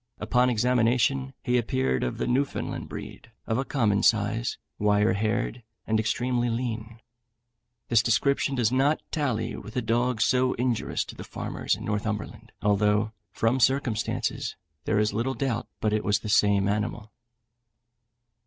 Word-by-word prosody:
Upon 125 +3 +2
examination, 125 +3 +2
he 125 0 +2
appeared 65 - 0
of 60 - -2
the - - -1
Newfoundland 135 +3 -1
breed, - - -8 0.2
of 110 +2 0
a - - +1
common 110 -8 +1
size, 110 +2 +1 0.2
wire 105 -1 +3
haired, 110 +4 -1 0.2
and 110 0 +1
extremely 120 +2 0
lean. 115 -1 -3 0.9
This 115 -2 +4
description 135 +4 +1
does 120 -3 +2
not 140 +4 +2
tally 130 -8 -1
with 110 - -9
the 125 - +1
dog 120 +1 +1
so 125 +3 +3
injurious 125 -2 -1
to - - -10
the - - -8
farmers - - -2
in - - -8
Northumberland, 105 0 -3
although, 105 +1 +2 0.2
from 115 +4 +1
circumstances, 125 -4 0 0.3
there 105 - +1
is 105 0 +2
little 120 +5 -1
doubt 130 -5 -2
but 105 -1 0
it 110 - 0
was 105 +1 +1
the 110 - -5
same 100 -1 +4
animal. 105 +2 -2
115 Hz, 145 wpm, -27 LUFS, 105-125 Hz, 0.9 s, This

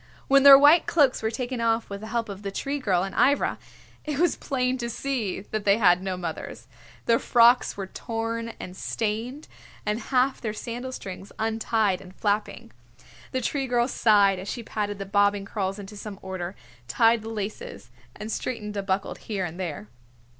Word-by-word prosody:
When 275 0 +6
their 275 0 +11
white 295 +4 +6
cloaks 285 -6 +3
were 220 - 0
taken 245 +1 -4
off 230 0 +1
with 200 0 -7
the 220 - -7
help 230 +1 -2
of 200 -1 -8
the 200 - -4
Tree 275 +8 -3
Girl 185 -8 +1
and 195 0 -5
Ivra, 285 +2 +2 0.4
it 300 -2 -3
was 350 +3 +2
plain 255 -2 -1
to 235 -1 -3
see 235 -6 -2
that 215 +1 -4
they 200 +1 +4
had 180 -5 +4
no 190 -1 -3
mothers. 165 -8 -6 0.4
Their 230 0 +3
frocks 240 -1 +4
were 195 - -3
torn 230 +3 -4
and 180 - -8
stained, 230 +9 -3 0.4
and 210 +1 0
half 260 +3 +1
their 215 -3 -3
sandal 245 +4 -5
strings 195 -5 -8
untied 220 -3 0
and 185 0 -14
flapping. 210 0 -2 0.6
The 260 - -1
Tree 270 +2 -1
Girl 240 -1 +2
sighed 205 -6 +4
as 190 - -8
she 240 - -4
patted 205 -2 -3
the 195 - -5
bobbing 200 0 +2
curls 195 -1 -3
into 205 +1 -9
some 205 -1 -7
order, 185 -1 -5 0.3
tied 225 - +3
the 220 - -7
laces 210 - -6 0.2
and 215 +2 -6
straightened 210 -3 -4
a 200 - -1
buckle 195 0 -1
here 200 -4 -4
and 175 +1 -7
there. 155 - -5
215 Hz, 185 wpm, -26 LUFS, 195-240 Hz, 0.6 s, their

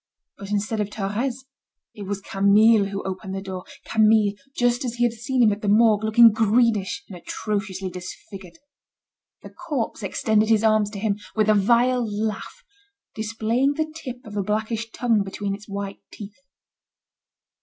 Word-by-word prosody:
But 200 - -8
instead 210 +2 -1
of 205 - -2
Thérèse, 230 +6 -3 0.5
it 205 -2 -8
was 200 0 -3
Camille 200 +2 +4
who 195 0 -5
opened 190 0 -5
the 195 - -4
door, 185 -2 -7 0.2
Camille, 215 -2 +3 0.2
just 245 0 +1
as 240 -2 -3
he 240 - 0
had 240 -1 +2
seen 245 +2 0
him 215 - +5
at 205 +1 -4
the 210 - -3
Morgue, 215 0 +4
looking 225 +1 +7
greenish, 215 -3 +1
and 190 - -10
atrociously 195 0 -4
disfigured. 185 0 -10 0.9
The - - -10
corpse 255 -6 -4
extended 215 +2 +1
his 220 -1 +3
arms 215 -2 +3
to 205 -1 -7
him, 210 -1 -1 0.2
with 215 -1 +2
a - - +5
vile 240 +5 +3
laugh, 215 - -4 0.5
displaying 225 +5 0
the 310 +1 -3
tip 255 -6 -8
of 210 -1 -9
a 205 - 0
blackish 220 +3 -2
tongue 225 -2 +1
between 195 +1 -4
its 205 +1 -9
white 200 0 -5
teeth. 205 0 -10
215 Hz, 165 wpm, -23 LUFS, 200-230 Hz, 0.9 s, looking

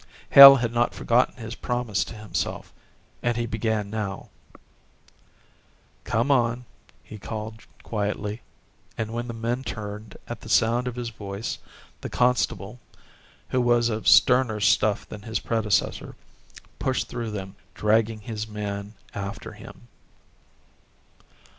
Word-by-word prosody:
Hale 140 0 +12
had 120 -3 -1
not 120 0 +1
forgotten 120 +2 +2
his 115 -2 -7
promise 120 -5 -1
to - - -9
himself 105 -1 -4 0.5
and 120 -1 0
he 120 - -1
began 110 -2 -2
now: 105 -3 -4 1.8
"Come 115 +5 +1
on," 120 -2 +1 0.4
he 105 - -11
called 110 +1 -7 0.2
quietly, 105 0 -3 0.6
and 110 0 -3
when 120 +1 -3
the 115 - -6
men 120 +3 -2
turned 105 -2 -7
at 120 -3 -7
the 110 - -10
sound 120 +3 +2
of 125 - -4
his 120 -1 -4
voice, 105 0 -6 0.4
the - - -5
constable, 125 -3 0 0.7
who 130 - +1
was 120 -1 +3
of 110 -1 -3
sterner 125 -4 +5
stuff 105 0 +2
than 105 - -9
his 110 +1 -3
predecessor, 110 -3 -1 0.6
pushed 130 -1 -1
through 120 -2 -4
them, 95 -2 -6 0.2
dragging 110 +1 +1
his 110 0 -5
man 105 -1 -5 0.2
after 100 +2 -6
him. - - -13
110 Hz, 130 wpm, -25 LUFS, 105-120 Hz, 1.8 s, Hale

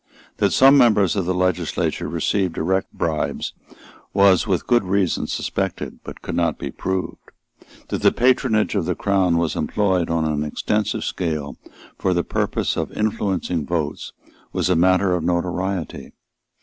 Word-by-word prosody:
That - - +2
some 135 +1 +6
members 105 -7 +4
of 95 -3 -1
the 90 - +1
legislature 90 -1 -1
received 95 -5 -1
direct 95 +1 -1
bribes 80 -2 -2 0.6
was 100 +1 +5
with 95 -4 0
good 120 -3 +3
reason 95 -1 0
suspected, - - -3
but - - -10
could - - -5
not 85 -3 0
be - - -5
proved. 95 -1 -4 0.6
That - - -2
the - - +5
patronage 125 -3 +2
of 100 -6 0
the 90 - -1
Crown 95 -4 +1
was 85 -2 0
employed 95 -5 0
on 85 -1 0
an 75 -1 -1
extensive 105 +7 -1
scale 75 -5 -3 0.4
for 95 -1 +1
the 85 - +1
purpose - - -1
of - - -2
influencing 95 -7 -1
votes 80 -4 -3 0.4
was 90 - +1
matter 90 +2 +3
of 90 -2 -1
notoriety. 90 0 -2
90 Hz, 150 wpm, -21 LUFS, 85-100 Hz, 0.6 s, some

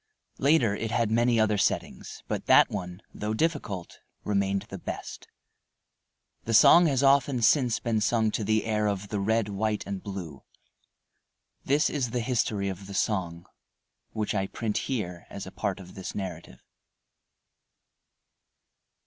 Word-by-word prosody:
Later, 135 -8 +3
it 115 +1 -3
had 115 -1 0
many 120 +1 +3
other 105 -2 +2
settings, - - -2
but - - -4
that - - +6
one, 90 0 -6
though 105 +1 -3
difficult, 110 - -2 0.2
remained 100 -1 0
the - - -9
best. - - -7 1.2
The 115 - +1
song 170 +9 +7
has 140 -2 +1
often 135 -3 +3
since 125 -2 +3
been 110 -2 -1
sung 110 0 +2
to 110 - -2
the 110 +1 +1
air 105 -1 0
of 100 0 -3
"The 105 - -2
Red, 110 +1 +1
White, 105 +1 -2
and 100 -1 -5
Blue." 90 -8 -7 1.2
This 145 +3 +3
is 135 -5 -2
the 120 +1 -2
history 110 -4 -1
of 95 0 -6
the 100 - -7
song, 85 -6 -1 0.6
which 105 0 -3
I 95 -2 -1
print 110 0 -2
here 90 -9 -4
as 100 - -7
a 95 - -9
part 100 -2 -3
of 90 -2 -12
this 95 - -7
narrative. 85 -9 -7
105 Hz, 150 wpm, -27 LUFS, 100-115 Hz, 1.2 s, song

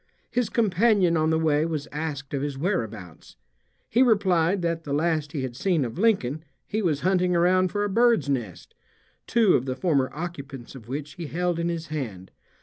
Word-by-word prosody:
His 240 -3 0
companion 205 -4 +3
on 155 0 +2
the 160 - +2
way 155 -2 +2
was 155 -3 -3
asked 150 -3 -5
of 140 - -1
his 145 -1 -3
whereabouts. 115 - -4 0.5
He 240 - +2
replied 190 -6 +3
that 165 -1 -1
the 140 - -4
last 155 -1 0
he 145 -5 -3
had 125 -2 -5
seen 165 -1 +1
of 120 +8 -6
Lincoln 160 - +1 0.2
he 215 - -2
was 155 -7 0
hunting 180 -1 +2
around 185 +2 +3
for 205 - -1
a - - +1
bird's 230 -1 +3
nest, 110 -11 -4 0.5
two 225 -5 +4
of 130 - +1
the 130 - -2
former 140 -5 +1
occupants 140 -6 -7
of 120 -5 -12
which 145 +3 -5
he 170 -3 -5
held 175 +2 -1
in 170 0 0
his 170 -1 -4
hand. 110 -12 -5
160 Hz, 190 wpm, -25 LUFS, 140-185 Hz, 0.5 s, two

